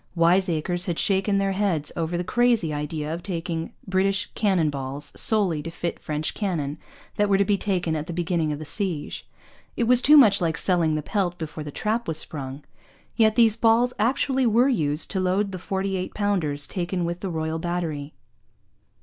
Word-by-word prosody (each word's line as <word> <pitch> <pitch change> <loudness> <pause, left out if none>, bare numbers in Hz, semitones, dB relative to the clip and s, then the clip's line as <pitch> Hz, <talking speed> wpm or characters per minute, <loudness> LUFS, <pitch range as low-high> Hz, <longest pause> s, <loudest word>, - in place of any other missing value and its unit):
Wise 180 +3 +3
acres 175 +3 0
had 170 -2 -2
shaken 195 +1 +1
their 195 0 +1
heads 190 -7 0
over 170 0 -2
the 175 - -2
crazy 230 -5 +2
idea 150 +1 -3
of 170 - -5
taking 170 -2 -4 0.2
British 195 +1 +1
cannon 185 -8 +1
balls 140 +1 -4
solely 195 -8 +2
to 165 - -6
fit 170 +1 -4
French 155 0 -3
cannon 160 -8 -3 0.4
that 205 0 +2
were 195 - +4
to 200 - +2
be 205 - +2
taken 180 -5 -1
at 155 0 -4
the - - -4
beginning 170 -2 -1
of 150 - -3
the 155 - -8
siege: 170 -3 -1 0.5
it - - +1
was 245 +1 +5
too 300 +3 +7
much 205 -8 +6
like 165 -1 0
selling 170 -4 +1
the 155 - -2
pelt 180 -2 -1
before 155 -1 -6
the 150 - -7
trap 220 +9 -2
was 160 -2 -2
sprung. 140 -3 -5 0.5
Yet 220 -2 +3
these 230 -3 +5
balls 230 +2 +3
actually 265 +2 +1
were 235 +4 +4
used 150 - -1
to 190 - -1
load 190 +2 0
the 185 - -6
forty 190 +1 -2
two - - -18
pounders 170 -9 0
taken 180 +1 -2
with 170 +1 -3
the 195 - -4
Royal 160 -1 -2
Battery! 160 -4 -3
180 Hz, 190 wpm, -24 LUFS, 160-205 Hz, 0.5 s, too